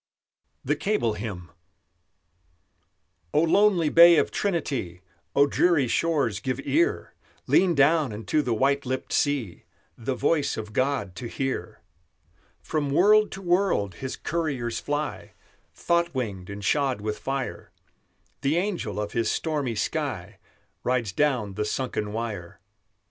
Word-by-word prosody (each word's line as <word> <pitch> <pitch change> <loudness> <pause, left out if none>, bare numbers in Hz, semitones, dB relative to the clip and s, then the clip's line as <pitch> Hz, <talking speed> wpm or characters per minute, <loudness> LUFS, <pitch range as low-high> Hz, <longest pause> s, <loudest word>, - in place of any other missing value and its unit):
THE - - +1
CABLE 120 - 0
HYMN 100 -5 -6 1.9
O 150 - +5
lonely 180 -2 +3
bay 170 +1 +8
of - - +2
Trinity, 140 - -2 0.3
O 140 - +6
dreary 150 -2 +2
shores, 140 -8 0
give 130 +4 -3
ear! 345 +5 0 0.3
Lean 180 -2 +3
down 145 -1 +3
unto 110 +8 -1
the 125 - -3
white 140 +4 +2
lipped 130 0 -4
sea 135 - 0 0.3
The 125 +3 -3
voice 145 +3 +1
of 110 -1 -6
God 130 -8 -1
to 120 - -5
hear! 135 +2 -4 0.8
From 150 -3 -1
world 210 +8 +5
to 195 - -8
world 175 - +1
His 130 +8 -5
couriers 135 -9 -2
fly, 145 +1 -4 0.4
Thought 170 -2 0
winged 100 -8 -4
and 100 0 -6
shod 140 -6 +1
with 105 +1 -4
fire; 135 -1 -4 0.7
The 140 +4 +1
angel 175 - -2
of 105 -1 -3
His 115 -1 0
stormy 145 -7 -1
sky 105 - -3 0.4
Rides 120 -5 0
down 125 -5 0
the 105 +2 -2
sunken 105 -2 -2
wire. 105 -6 -5
135 Hz, 130 wpm, -26 LUFS, 110-160 Hz, 1.9 s, bay